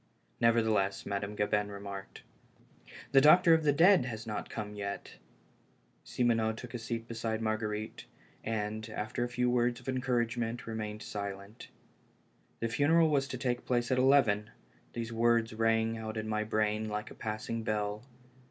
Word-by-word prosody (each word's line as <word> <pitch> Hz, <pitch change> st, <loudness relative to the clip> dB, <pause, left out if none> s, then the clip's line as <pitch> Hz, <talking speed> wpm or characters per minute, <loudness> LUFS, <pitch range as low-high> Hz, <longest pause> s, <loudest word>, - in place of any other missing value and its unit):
Nevertheless, 110 Hz, -4 st, +2 dB
Madame 100 Hz, +1 st, -3 dB
Gabin 105 Hz, 0 st, 0 dB
remarked: 100 Hz, -1 st, -8 dB, 0.9 s
"The 135 Hz, -, +6 dB
doctor 165 Hz, +3 st, +7 dB
of 160 Hz, -1 st, +3 dB
the 150 Hz, -, +4 dB
dead 170 Hz, 0 st, +5 dB
has 115 Hz, -2 st, -5 dB
not 105 Hz, -2 st, -4 dB
come 105 Hz, -2 st, -5 dB
yet." 100 Hz, -1 st, -6 dB, 0.9 s
Simoneau 115 Hz, -3 st, +1 dB
took 115 Hz, +2 st, -9 dB
a 120 Hz, -, -4 dB
seat 115 Hz, 0 st, -4 dB
beside 115 Hz, -1 st, -3 dB
Marguerite, 110 Hz, -1 st, -3 dB, 0.4 s
and, 110 Hz, 0 st, -3 dB
after 110 Hz, +3 st, -3 dB
a 120 Hz, -, -2 dB
few 125 Hz, 0 st, 0 dB
words 120 Hz, -1 st, +1 dB
of -, -, -17 dB
encouragement, 120 Hz, -2 st, -1 dB
remained 110 Hz, -1 st, -5 dB
silent. 100 Hz, +1 st, -6 dB, 0.9 s
The 115 Hz, -, +1 dB
funeral 160 Hz, +7 st, +3 dB
was 140 Hz, -2 st, +2 dB
to 130 Hz, -, -5 dB
take 125 Hz, -1 st, -1 dB
place 120 Hz, -1 st, 0 dB
at 130 Hz, -, +3 dB
eleven! 120 Hz, -6 st, +4 dB, 0.4 s
These 115 Hz, 0 st, -4 dB
words 115 Hz, 0 st, +2 dB
rang 115 Hz, 0 st, +1 dB
in 110 Hz, 0 st, -4 dB
my 110 Hz, 0 st, -1 dB
brain 110 Hz, 0 st, 0 dB
like 105 Hz, 0 st, -4 dB
a -, -, -8 dB
passing 110 Hz, +1 st, -4 dB
bell. 105 Hz, -1 st, -2 dB
115 Hz, 150 wpm, -31 LUFS, 105-120 Hz, 0.9 s, doctor